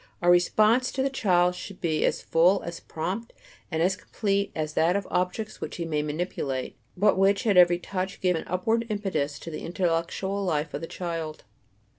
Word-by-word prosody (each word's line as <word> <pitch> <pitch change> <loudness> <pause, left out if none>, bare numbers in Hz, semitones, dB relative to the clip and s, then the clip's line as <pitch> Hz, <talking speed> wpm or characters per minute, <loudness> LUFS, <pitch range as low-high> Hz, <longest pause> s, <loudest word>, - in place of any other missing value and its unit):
Our 175 0 +4
"response" 215 +8 +4
to 265 - 0
the 275 - 0
child 180 -8 +3
should 190 +1 -9
be 160 -2 0
as - - 0
full, 180 +4 +3
as 170 0 -6
prompt 190 +8 -4 0.4
and 160 -1 0
as 190 +2 +2
complete 200 +1 -1
as 155 -1 -2
that 170 +4 +3
of 200 - 0
the - - -15
objects 185 +4 -2
which - - -5
he 170 - -3
may 155 -2 0
manipulate, 150 -4 -3 0.2
but 200 0 +3
which 195 +4 +3
at 205 -3 +3
every 175 -1 +7
touch 185 +1 -4
give 180 -1 +2
an 160 - -4
upward 225 +6 0
impetus 170 -9 -2
to 165 - -8
the 155 - -6
intellectual 175 +3 -1
life 155 -4 -1
of 145 - -4
the 165 - -5
child. 165 -4 -5
180 Hz, 195 wpm, -26 LUFS, 165-200 Hz, 0.4 s, every